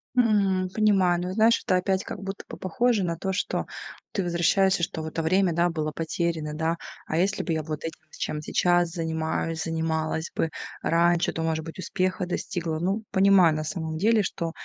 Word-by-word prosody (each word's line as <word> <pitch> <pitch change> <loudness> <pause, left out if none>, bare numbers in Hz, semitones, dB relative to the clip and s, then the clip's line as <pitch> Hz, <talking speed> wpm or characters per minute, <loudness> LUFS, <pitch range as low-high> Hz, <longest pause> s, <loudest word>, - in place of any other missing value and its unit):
Мгм, 200 -6 +3
понимаю, 190 -4 +3
но 180 +1 -3
знаешь, 225 +3 +4
это 185 - +3
опять 190 +1 +1
как - - -6
будто 195 0 -6
бы - - -8
похоже 220 +3 +1
на 170 -2 -1
то, 190 +2 -2
что 190 - -1 0.5
ты 200 - -1
возвращаешься, 180 +1 +2
что 160 - -2
в 155 - -5
это 160 +1 -3
время 185 +1 +3 0.2
было 155 -2 -2
потеряно, 160 0 -2
да. 165 +2 0 0.3
А 160 - -1
если 190 +3 +1
бы 175 - -3
я 160 -1 0
вот 155 -1 -5
этим, 165 0 -5
чем 150 - -3
сейчас 175 +1 +2
занимаюсь, 160 -1 -2
занималась 160 0 -1
бы 160 - 0 0.3
раньше, 170 +1 +3
то, 165 - -3
может 160 -1 -1
быть, 165 +3 -9
успеха 185 +1 -1
достигла. 170 -2 -3
Ну, 195 +5 -1
понимаю, 190 -5 +5
на 155 - -2
самом 160 0 -4
деле, 215 +5 +3
что 170 -3 -3
175 Hz, 185 wpm, -26 LUFS, 160-190 Hz, 0.5 s, понимаю